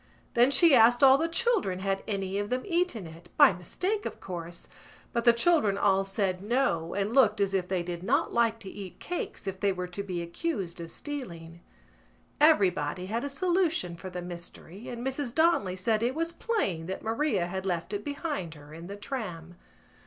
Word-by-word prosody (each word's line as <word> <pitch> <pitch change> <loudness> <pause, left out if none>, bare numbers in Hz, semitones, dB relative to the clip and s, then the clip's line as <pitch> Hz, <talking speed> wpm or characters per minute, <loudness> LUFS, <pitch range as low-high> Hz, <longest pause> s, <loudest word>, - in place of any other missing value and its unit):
Then 240 +2 +5
she 300 +3 +6
asked 240 +1 +6
all 270 0 +8
the 325 - +1
children 360 - +1
had 195 +1 -1
any 195 -1 -2
of 205 0 -3
them 255 +1 -1
eaten 345 - 0
it—by 165 +1 +3
mistake, 375 - -3
of - - -8
course—but 175 +6 -7
the 235 - +9
children 235 - +3
all 195 -1 +3
said 195 -2 -1
no 205 -7 0
and 200 +3 -1
looked 225 -6 +4
as 200 -1 +1
if 185 -2 0
they 185 -2 -1
did 175 -1 -5
not 280 - +1
like 230 -1 +2
to 195 - -8
eat 195 -3 -9
cakes 355 -10 -5
if 190 -1 -4
they 200 0 +2
were 180 -1 -3
to 180 +2 -5
be 180 -3 -4
accused 180 - -4
of 165 0 -8
stealing. 170 - -7 0.8
Everybody 185 - +3
had 225 +5 -2
a 285 - -2
solution 340 - 0
for 185 +2 -8
the 180 -1 -6
mystery 175 +3 -9
and 240 +1 -6
Mrs 265 -2 -3
Donnelly 315 - +3
said 215 +4 0
it 245 +3 0
was 330 +1 -1
plain 200 - -2
that 190 - -5
Maria 225 - 0
had 190 +2 -4
left 170 0 -2
it 205 0 -3
behind 285 - -4
her 145 0 -14
in 165 +2 -9
the 200 - -6
tram. 180 -8 -5
200 Hz, 190 wpm, -28 LUFS, 180-270 Hz, 0.8 s, the